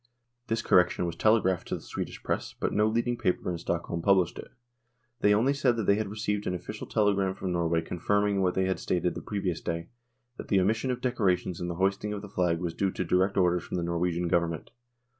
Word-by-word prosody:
This 115 0 -1
correction 90 -1 +3
was 85 -1 -3
telegraphed 100 -5 +2
to - - -2
the - - -7
Swedish - - -6
Press, - - -2
but - - -1
no 105 +1 +3
leading 120 +2 0
paper 90 0 0
in 85 - -4
Stock 85 0 -2
holm 85 - -3
published 90 -1 +3
it. - - -9 0.7
They 105 - +4
only 115 +7 +3
said 130 -4 +2
that 115 - 0
they 100 - +5
had 105 0 -1
received 105 0 -2
an 90 - 0
official 105 +4 -7
telegram 100 -3 +1
from 95 - -3
Norway 85 -1 +1
confirming 100 +3 0
what 90 -1 +1
they 95 - +2
had 95 0 -1
stated 90 -1 0
the - - -6
previous 95 -5 -3
day, 85 0 -4 0.5
that - - -7
the 100 - +3
omission 110 +7 +1
of 125 -1 -2
decorations 95 -8 0
and 90 - -2
the 85 - -3
hoisting 100 +3 0
of 100 0 -5
the 100 - -8
flag 90 -3 +1
was 85 -1 -3
due 100 +2 0
to 90 - -3
direct 95 +3 +2
orders 90 -2 +3
from - - -4
the 85 - -1
Norwegian 85 0 0
Govern 85 0 +2
ment. 80 -2 -7
95 Hz, 230 wpm, -28 LUFS, 90-105 Hz, 0.7 s, they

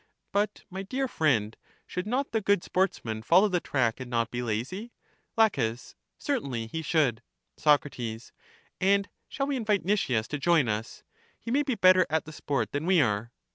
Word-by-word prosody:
But, 205 +1 -1
my 190 +1 -4
dear 260 +7 -2
friend, 120 - +1 0.3
should 180 +2 -4
not 265 +5 -1
the 225 - 0
good 200 -2 +2
sportsman 115 - -1
follow 185 - +5
the 180 -2 +1
track, 125 -7 0
and 130 -1 -7
not 115 -1 0
be 120 - -3
lazy? 125 - -4 0.4
La, 225 0 +7 0.7
Certainly, 140 - -2
he 160 +9 -5
should. 145 -7 +1 0.3
Soc, 150 -2 +4 0.9
And 200 +1 +2 0.2
shall 275 - -2
we 280 0 -1
invite 210 -6 0
Nicias 130 - +1
to 150 - -3
join 160 -4 +3
us? 115 - -4 0.4
he 230 - -6
may 280 +4 +3
be 270 -4 -1
better 185 -2 +5
at 160 +1 0
the 155 - -10
sport 135 -8 -2
than 145 +4 -3
we 185 -2 +5
are. 110 -3 +1
170 Hz, 175 wpm, -28 LUFS, 120-205 Hz, 0.9 s, La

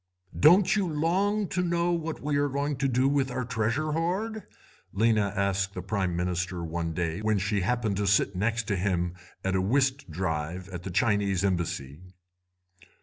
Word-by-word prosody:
"'Don't 180 +7 +6
you 200 -3 +1
long 190 +7 +1
to 180 - -1
know 170 0 +1
what 165 -2 -3
we 145 0 0
are 145 0 +2
going 140 +2 -1
to 135 +1 0
do 130 +1 +2
with 140 -1 +1
our 125 0 -3
treasure 120 +6 -1
hoard?' 190 +7 -2 0.5
Lena 110 -1 +2
asked 100 0 0
the 90 - -4
Prime 95 -3 -1
Minister 90 0 -2
one 85 0 -3
day 85 +1 -2
when 110 -1 +1
she 100 +1 0
happened 110 0 0
to 100 -1 0
sit 100 -1 +3
next 115 +4 0
to 105 -2 -1
him 90 -2 0 0.3
at 95 0 0
a 95 - +2
whist 130 +3 +1
drive 80 +1 -3
at 90 -2 -6
the 95 - -6
Chinese 100 -1 +1
Embassy. 80 -6 -2
105 Hz, 175 wpm, -27 LUFS, 95-145 Hz, 0.5 s, Don't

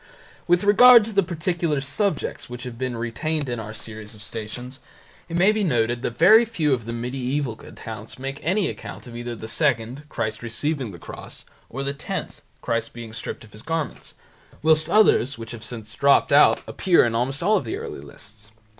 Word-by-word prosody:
With 175 +1 +3
regard 230 +2 +8
to 220 - -6
the 200 - +4
particular 170 -3 -1
subjects 145 +5 -2
which 125 0 -7
have 125 -2 -6
been 130 -2 -2
retained 145 +6 -2
in 120 -2 -3
our 110 -1 -6
series 110 0 -8
of 105 - -12
Stations, 120 +4 -7 0.5
it 170 - -2
may 190 +4 +5
be 215 -1 0
noted 120 - +1
that 120 -2 -3
very 215 +8 +8
few 165 -11 0
of 120 -4 -2
the 115 - -4
medieval 125 +2 -2
accounts - - -9
make 135 +1 -5
any 185 +5 +1
mention - - -5 0.2
of - - -10
either 120 0 -5
the 110 - -8
second 135 +1 -1
(Christ 110 -5 -3
receiving 130 +3 -2
the 90 - -9
cross) - - -10 0.2
or 135 +3 -4
the 140 0 -2
tenth 140 - -5 0.2
(Christ 115 0 -1
being 115 -2 -9
stripped 115 - -5
of 110 - -16
His 105 - -10
garments), 160 +2 -4 0.5
whilst 155 0 +4
others 170 - +4
which 115 +1 -7
have 115 -3 -7
since 110 -1 -6
dropped 140 0 +4
out 145 - +6
appear 180 -8 +3
in 115 - -1
almost 130 +6 -1
all 210 +2 +4
the 115 - -4
early - - -6
lists. 105 +1 -12
130 Hz, 190 wpm, -23 LUFS, 115-160 Hz, 0.5 s, regard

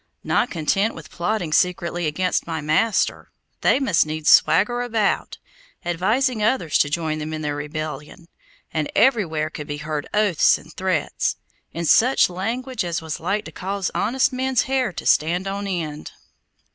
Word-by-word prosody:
Not - - +1
content 195 +7 0
with 155 -1 -11
plotting 175 -3 -2
secretly 175 -1 +1
against 180 +5 -1
my 165 -1 -3
master, 155 +8 +1 0.3
they - - +3
must 205 - +3
needs 155 0 0
swagger 210 +10 +4
about, 225 -4 -1 0.5
advising 215 +8 +1
others 210 - +1
to 145 - +3
join 155 0 -2
them 155 +1 -5
in 155 0 -4
their 145 -1 -2
rebellion, 150 +2 -6 0.5
and 155 -2 -2
everywhere 170 - +2
could 150 -2 -7
be 145 -1 -4
heard 150 -1 -4
oaths 210 -6 +3
and - - -15
threats, - - -1 0.4
in 170 +1 -4
such 240 - +4
language 240 +8 -3
as 170 -1 -2
was 160 -2 -5
like 200 +6 -1
to - - -8
cause 195 0 -3
honest 255 +5 +1
men's 260 0 +1
hair 260 -4 0
to - - -7
stand 175 +5 +2
on 200 +1 -3
end. 160 -6 -4
175 Hz, 160 wpm, -22 LUFS, 155-215 Hz, 0.5 s, swagger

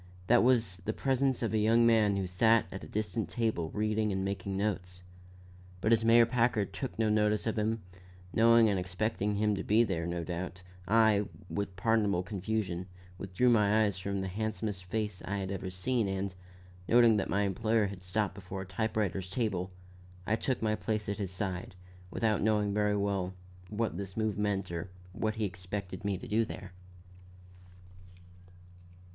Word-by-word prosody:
That 120 +5 +5
was 115 -7 +2
the 95 +4 -4
presence 135 -1 +1
of 110 - -1
a 110 - +2
young 115 +2 +4
man 110 -3 +4
who 95 - -1
sat 110 +5 +3
at 95 - -7
a - - -8
distant 110 -2 -2
table 110 -9 -1
reading 110 +1 0
and 95 0 -1
making 100 0 -3
notes. 90 -3 -2 0.8
But 110 +5 +3
as 115 0 +3
Mayor 115 +1 +6
Packard 115 -4 +1
took 130 +6 -5
no 110 -1 +2
notice 105 0 +2
of 110 - 0
him, 110 0 -1 0.5
knowing 115 0 +6
and 100 -3 +1
expecting 100 +3 -1
him 105 +1 +2
to 95 - -3
be 110 +3 +4
there, 85 -6 -2
no 85 -1 -2
doubt, 90 +1 -5 0.2
I, 110 -1 +4 0.2
with 100 -1 -2
a - - -20
pardonable 100 -1 +1
confusion, 95 -2 -3 0.3
withdrew 100 +6 +1
my 110 -1 +4
eyes 100 -4 -1
from 100 +1 -2
the 95 - -3
handsomest 105 -1 -3
face 105 0 -3
I 100 +1 -3
had 95 -1 -3
ever 95 -1 -4
seen, 100 +5 0
and, 95 0 -2 0.5
noting 120 -2 +6
that 100 - -1
my 100 - +1
employer 110 +3 +1
had 100 -2 -6
stopped 95 +2 -1
before 95 0 -6
a - - -10
type 110 +4 -2
writer's 95 -3 -1
table, 95 -4 -1 0.6
I 110 - +2
took 125 +1 -2
my 110 -1 +2
place 105 -1 -2
at 100 - -3
his 100 -3 -2
side, 95 0 -4 0.3
without 110 +2 0
knowing 105 -1 +2
very 105 0 +2
well 100 -2 -1 0.3
what 110 -4 -2
this 95 0 -6
move 110 -2 0
meant 100 -3 -1
or 85 +1 -4 0.2
what 110 +3 -1
he 110 -1 -1
expected 95 +1 -5
me 100 -2 -1
to - - -9
do 110 +2 +2
there. 100 -3 -7
105 Hz, 180 wpm, -31 LUFS, 95-110 Hz, 0.8 s, Mayor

